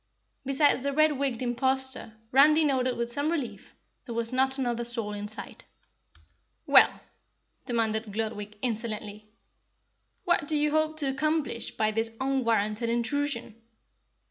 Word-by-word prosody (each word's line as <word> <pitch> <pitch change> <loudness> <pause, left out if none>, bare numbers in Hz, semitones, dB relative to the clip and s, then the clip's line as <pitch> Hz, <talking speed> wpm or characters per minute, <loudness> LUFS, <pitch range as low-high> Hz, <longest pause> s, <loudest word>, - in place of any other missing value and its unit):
Besides 275 0 +3
the 280 +1 -2
red 310 -1 +3
wigged 260 -3 -1
imposter 260 -1 -1 0.2
Randy 300 +4 +6
noted 255 -3 +1
with 235 0 -2
some 285 +5 -1
relief, 290 -8 -5 0.3
there 235 - -5
was 230 +1 -1
not 265 +1 +2
another 240 -3 -1
soul 230 -3 -3
in 205 0 -5
sight. 215 - -9 1.0
"Well," - - +5 0.7
demanded 225 -3 -1
Gludwig, 210 -1 -4
insolently, 215 -3 -4 1.0
"what 345 -4 +2
do 305 - +1
you 300 0 +1
hope 310 0 +1
to 300 - +7
accomplish 300 -3 -2
by 215 0 +1
this 225 +1 -2
unwarranted 230 -4 0
intrusion?" 235 -1 -2
245 Hz, 130 wpm, -28 LUFS, 225-280 Hz, 1.0 s, to